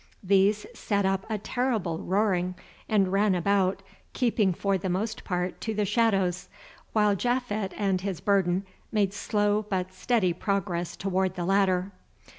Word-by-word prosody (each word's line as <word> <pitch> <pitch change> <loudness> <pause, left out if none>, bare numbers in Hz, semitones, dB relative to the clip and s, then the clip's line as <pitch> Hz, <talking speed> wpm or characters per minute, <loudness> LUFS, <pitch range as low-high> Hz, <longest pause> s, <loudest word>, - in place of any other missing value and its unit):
These 200 +2 +3
set 200 -2 -1
up 190 0 0
a 220 - -1
terrible 215 -7 -1
roaring, 185 -2 0 0.3
and 195 -4 +3
ran 200 0 +3
about, 195 +1 +1 0.3
keeping 225 -6 +2
for 195 +3 0
the 190 0 -2
most 215 +5 -2
part 180 0 -3
to 220 -1 -3
the 210 0 +1
shadows, 195 -4 +1 0.4
while 210 -2 +3
Japhet 220 -3 -1
and 195 -3 0
his 190 -3 -3
burden 190 -1 +1 0.3
made 200 -3 +1
slow 205 0 +1
but 185 -2 -2
steady 185 -3 +1
progress 175 -2 -2
toward 190 -1 -1
the 175 -2 -3
ladder. 190 0 +2
195 Hz, 145 wpm, -27 LUFS, 185-210 Hz, 0.4 s, These